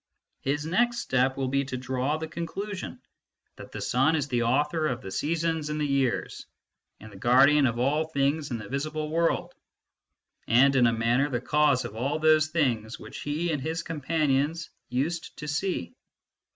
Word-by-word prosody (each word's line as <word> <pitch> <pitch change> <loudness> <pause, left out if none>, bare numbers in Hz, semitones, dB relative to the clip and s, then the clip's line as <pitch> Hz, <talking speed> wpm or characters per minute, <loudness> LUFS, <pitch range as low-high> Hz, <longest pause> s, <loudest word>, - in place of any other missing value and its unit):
His 145 +2 -2
next 240 +8 +1
step 130 - +1
will 135 -1 -1
be 140 +1 +1
to 130 -1 -4
draw 130 +3 -1
the 160 0 -5
conclusion, 185 +5 -5 0.6
that - - -11
the - - -6
sun 135 +6 +2
is 145 -3 -1
the 120 -3 +1
author 150 +6 +1
of 125 -4 -3
the 95 - -7
seasons 160 - -1
and 150 0 -2
the 150 - 0
years, 140 -3 -1 0.5
and 110 +1 -12
the 100 - -12
guardian 135 +6 +5
of 115 -1 -2
all 145 +6 +1
things 145 0 0
in 120 - -2
the 105 -2 -8
visible 155 +3 -3
world, 165 +1 0 0.9
and 135 +5 +5
in 125 -2 +5
a - - +3
manner 120 +5 +1
the 120 -3 -1
cause 145 0 +2
of 105 - -7
all 135 +6 -1
those 155 -1 +4
things 125 -9 -1
which - - -9
he 155 +4 -1
and 150 -3 -2
his 160 +4 -3
companions 155 0 -1 0.2
used 160 +7 -2
to 150 - -7
see. 150 - -2
145 Hz, 180 wpm, -27 LUFS, 130-155 Hz, 0.9 s, guardian